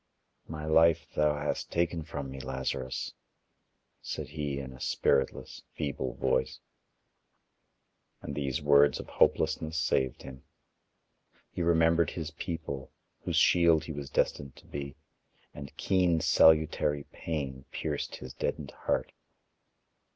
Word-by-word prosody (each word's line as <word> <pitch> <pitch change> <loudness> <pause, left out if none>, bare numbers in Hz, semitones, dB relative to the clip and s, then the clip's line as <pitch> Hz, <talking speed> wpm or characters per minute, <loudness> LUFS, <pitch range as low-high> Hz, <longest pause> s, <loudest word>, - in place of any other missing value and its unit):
"My 75 -1 -6
life 80 +1 +4
thou 75 -1 +2
hast 75 0 -3
taken 85 -1 0
from 70 -4 -6
me, 65 - -7
Lazarus," 65 0 -3 0.9
said - - -5
he 75 -2 -3
in 65 -2 -6
a 65 - -13
spiritless, 65 -1 0
feeble 65 -4 -3
voice. 65 0 0 1.6
And - - -5
these 70 -1 -2
words 70 0 +5
of - - -6
hopelessness 80 0 +1
saved 65 -6 0
him. 65 0 -10 1.1
He - - -4
remembered 85 -1 +3
his 80 -2 -5
people, 80 -6 -5 0.3
whose - - -1
shield 85 -3 +5
he 80 - -6
was 70 -2 -6
destined 70 -3 -1
to - - -17
be, 70 -1 -6 0.6
and 70 -2 -10
keen 90 -3 +2
salutary 80 -2 +4
pain 70 -5 -4
pierced - - -3
his 65 - -9
deadened 70 - -3
heart. - - -2
75 Hz, 120 wpm, -30 LUFS, 65-80 Hz, 1.6 s, words